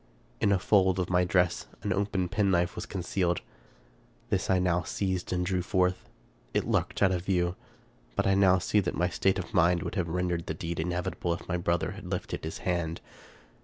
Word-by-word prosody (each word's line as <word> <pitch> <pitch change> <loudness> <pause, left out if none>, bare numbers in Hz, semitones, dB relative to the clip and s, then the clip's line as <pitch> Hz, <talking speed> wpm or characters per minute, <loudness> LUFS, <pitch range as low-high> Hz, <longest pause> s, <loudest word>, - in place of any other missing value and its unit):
In 100 - +3
a 100 - +4
fold 95 -1 +3
of 90 -1 -1
my 90 0 +4
dress 90 -1 +1 0.2
an 100 - 0
open 100 -1 0
penknife 90 -3 +1
was - - -6
concealed. 90 -2 -1 0.9
This - - 0
I 95 - +4
now 90 -1 +2
seized 95 +1 -2
and 90 0 0
drew 90 0 0
forth. 90 0 0 0.5
It - - +2
lurked - - 0
out 95 - +5
of 90 -2 -1
view; 90 -2 +1 0.6
but - - +1
I 95 - +4
now 95 -1 +5
see 100 +4 +2
that 90 -3 -1
my 90 +2 +1
state 95 +1 +1
of 90 - -5
mind 85 0 +3
would - - -4
have 90 -5 -1
rendered 90 -1 -1
the 80 - -2
deed 85 0 -4
inevitable 90 +1 -1
if - - -11
my 90 - 0
brother 85 -1 0
had - - -9
lifted - - -3
his 80 - -4
hand. 85 -2 -1
90 Hz, 200 wpm, -29 LUFS, 85-95 Hz, 0.9 s, out